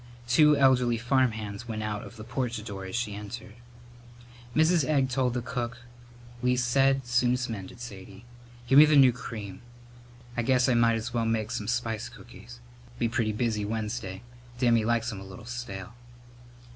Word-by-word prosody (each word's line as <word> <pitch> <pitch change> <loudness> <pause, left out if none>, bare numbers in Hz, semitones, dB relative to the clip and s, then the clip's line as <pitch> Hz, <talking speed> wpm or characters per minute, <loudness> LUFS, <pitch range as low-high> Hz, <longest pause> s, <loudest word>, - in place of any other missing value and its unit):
Two 150 +4 +5
elderly 125 -3 +4
farmhands 115 -4 0
went 110 -2 -4
out 105 -1 -3
of - - -11
the 110 - -8
porch 120 -2 -3
door 100 -3 -7
as 95 - -6
she 120 -3 -2
entered. 105 +3 -8 1.0
Mrs. 160 +1 +4
Egg 135 -2 +1
told 125 -1 0
the 125 - -2
cook: 120 -2 -4 0.6
"Least 125 0 +1
said, 135 +1 +3
soon'st 125 0 +1
mended, 110 +3 -7
Sadie. 100 -2 -10 0.4
Give 135 +3 +6
me 155 - +10
the 155 0 +3
new 135 -3 +7
cream. 110 -5 -7 0.7
I 120 - 0
guess 125 +1 +3
I 130 - +3
might's 115 -1 +2
well 115 -1 0
make 110 -1 -1
some 105 - -3
spice 115 -2 -2
cookies. 120 0 -13 0.4
Be 120 - +1
pretty 115 -2 0
busy 110 -1 -1
Wednesday. 105 -2 -4 0.3
Dammy 120 -3 +3
likes 115 +1 0
'em 100 - -6
a - - -9
little 95 +4 -11
stale." 120 -4 -6
120 Hz, 165 wpm, -28 LUFS, 110-125 Hz, 1.0 s, me